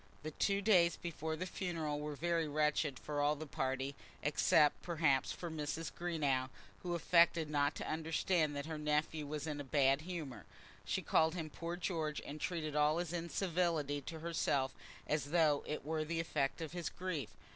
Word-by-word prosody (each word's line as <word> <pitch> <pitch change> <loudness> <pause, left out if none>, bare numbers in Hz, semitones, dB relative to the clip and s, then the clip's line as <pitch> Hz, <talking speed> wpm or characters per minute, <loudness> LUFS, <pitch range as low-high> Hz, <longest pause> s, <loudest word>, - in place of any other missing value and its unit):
The 155 - -4
two 200 +5 +1
days 180 -5 +5
before 160 -2 -3
the 180 - -3
funeral 165 -5 -2
were 150 0 -4
very 165 +1 0
wretched 150 -2 +1
for 145 +2 -3
all 145 +1 +3
the 155 +2 -6
party, 135 -2 -2 0.3
except, 150 - +4
perhaps, 155 -6 +2
for 170 -2 -5
Mrs. 155 +1 -3
Greenow, 145 -7 0 0.3
who 175 -1 -2
affected 170 -2 +4
not 145 0 +2
to - - -5
understand 160 0 +1
that 140 0 -3
her 160 -1 -4
nephew 150 0 0
was 150 0 -3
in 150 -2 -3
a - - -5
bad 135 0 +3
humour. 160 -6 -6 0.4
She - - -1
called 160 +2 +3
him 160 -3 -4
"poor 170 +3 -4
George," 160 -4 -1
and 150 +1 -7
treated 155 -4 -2
all 150 +1 +4
his 175 -1 -2
incivility 170 -4 0
to 160 +3 -7
herself 145 -5 0 0.3
as 150 -3 0
though 150 -1 +3
it 150 -2 -4
were 155 0 0
the 165 +2 -2
effect 150 -2 -1
of 160 - -4
his 175 -1 -3
grief. 170 - -3
155 Hz, 180 wpm, -36 LUFS, 145-170 Hz, 0.4 s, days